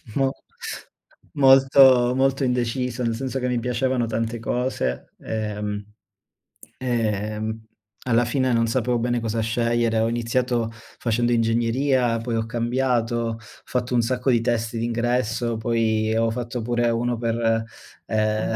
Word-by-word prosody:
mo 135 -1 +2 1.0
molto, 135 -2 +6
molto 135 +1 +1
indeciso, 125 0 -1
nel 115 -1 0
senso 135 +1 -3
che 125 - -1
mi 125 -1 0
piacevano 125 +1 0
tante 115 +1 -2
cose, 115 - -2
ehm 105 -2 -3 1.0
ehm, 110 -2 -2 0.5
alla 120 0 +3
fine 130 +1 +1
non 115 0 +2
sapevo 120 0 0
bene 120 0 0
cosa 115 0 -2
scegliere. 115 0 +1
Ho 110 - +2
iniziato 120 0 0 0.3
facendo 120 +1 0
ingegneria, 120 +2 +1
poi 115 0 -3
ho 110 - -1
cambiato, 120 0 0
ho 115 -1 -2
fatto 120 +3 -4
un 120 - +4
sacco 125 +2 0
di 120 - +4
test 115 -1 -1
d'ingresso, 120 0 -1
poi, 110 -1 0
ho 115 0 +2
fatto 120 0 -4
pure 120 +1 +1
uno 120 +1 0
per 115 -1 0 0.4
ehm, 110 0 0
120 Hz, 135 wpm, -23 LUFS, 115-125 Hz, 1.0 s, molto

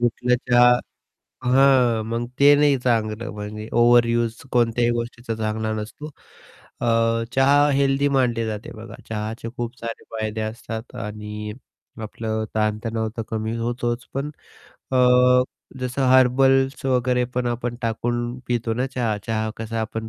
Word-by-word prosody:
उठलं 120 +1 +1 0.2
चहा 120 0 +7 0.7
हां, 125 -3 +4
मग 115 +1 -2
ते 145 +1 +8
नाही 145 -1 +4
चांगलं. 115 -2 -1
म्हणजे 105 +1 -7
ओव्हरयूज 120 -1 +3 0.2
कोणत्याही 120 0 +2
गोष्टीचा 120 0 -4
चांगला 110 0 -2
नसतो. 110 +8 -6 0.7
अ, 120 - 0 0.5
चहा 140 +2 +5
हेल्दी 140 0 +2
मानली 125 -4 +1
जाते 110 -1 -5
बघा. 110 0 -10
चहाचे 110 +1 -4
खूप 120 +1 -4
सारे 115 0 -6
फायदे 110 0 -3
असतात 115 +2 -6
आणि 105 -1 -6 0.5
आपलं 110 0 -3
ताणतणाव 110 +1 -1
तर - - -1
कमी 110 0 -2
होतोच 120 +1 -2
पण 140 +2 -2 0.6
अ, - - +2 0.8
जसं 125 +2 -2
हर्बल्स 135 +2 +4
वगैरे 125 -1 +2
पण 125 -1 0
आपण 120 0 -2
टाकून 120 +2 -2
पितो 115 -2 -1
ना 125 +3 -1
चहा 120 -5 -1
चहा 110 -1 -1
कसा 115 0 -4
आपण 110 0 -4
120 Hz, 130 wpm, -22 LUFS, 110-125 Hz, 0.8 s, ते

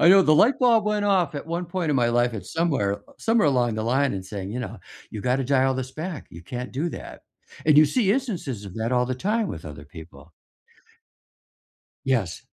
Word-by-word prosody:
I 165 - +6
know 195 +1 +8
the 155 -3 +4
light 230 - +4
bulb 235 -4 +4
went 210 -1 0
off 185 -7 +2
at 145 - -5
one 170 +2 -2
point 175 -2 -2
in 145 - +2
my 120 -2 +3
life 120 0 +1
at 100 -4 -6
somewhere 140 -12 0 0.2
somewhere 225 -5 +2
along 120 -4 +1
the 110 0 -3
line 130 +3 +1
and 95 -1 -5
saying, 95 0 -6
you 120 - -4
know, 125 - -6 0.3
"You 105 - -6
gotta 125 +4 0
dial 135 0 +2
this 130 0 -5
back. 160 0 -6
You 85 - -11
can't 125 +7 -6
do 145 +7 -1
that." - - -9 0.4
And 155 -1 +5
you 155 - +8
see 200 - +1
instances 185 - -2
of 95 -2 -9
that 115 +1 -2
all 125 0 +2
the 130 - -2
time 210 - 0
with 80 - -7
other 75 -2 -9
people. 80 0 -13 1.7
Yes. 115 -10 0
130 Hz, 215 wpm, -24 LUFS, 110-175 Hz, 1.7 s, know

